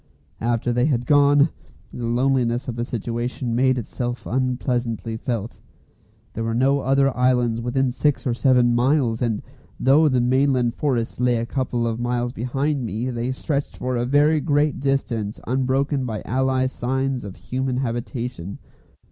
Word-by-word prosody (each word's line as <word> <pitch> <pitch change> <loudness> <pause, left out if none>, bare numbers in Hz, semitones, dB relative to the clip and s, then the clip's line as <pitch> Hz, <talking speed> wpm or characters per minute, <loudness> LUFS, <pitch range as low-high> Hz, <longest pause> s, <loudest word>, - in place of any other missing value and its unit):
After 120 +1 0
they 125 +3 +2
had 125 -5 0
gone, 145 +2 +5 0.4
the 120 -1 -4
loneliness 125 0 +1
of 120 - -3
the 120 - -2
situation 120 +1 -3
made 130 +1 +3
itself 120 +1 -4
unpleasantly 125 -3 -1
felt. 115 -1 -4 0.7
There 115 - -3
were 115 0 -1
no 135 +3 +3
other 135 0 +2
islands 125 -2 +2
within 125 +2 0
six 145 +3 0
or 125 - +1
seven 125 -1 +3
miles, 120 -2 +2
and 115 -4 -1 0.4
though 145 +4 +5
the 130 -2 +2
mainland 125 -1 +2
forests 125 -7 -1
lay 125 -1 +3
a 115 - -2
couple 125 -2 -1
of 115 0 -2
miles 120 0 -1
behind 135 +4 -1
me, 115 +4 -3
they 120 +1 -2
stretched 140 +2 -3
for 125 0 -2
a 120 0 -1
very 145 +3 +4
great 145 -1 +1
distance 120 -6 -1
unbroken 135 +2 0
by 110 -2 -4
any 130 +1 +1
signs 130 0 -2
of 100 -2 -8
human 130 0 -3
habitation. 120 -5 -4
125 Hz, 155 wpm, -22 LUFS, 120-135 Hz, 0.7 s, gone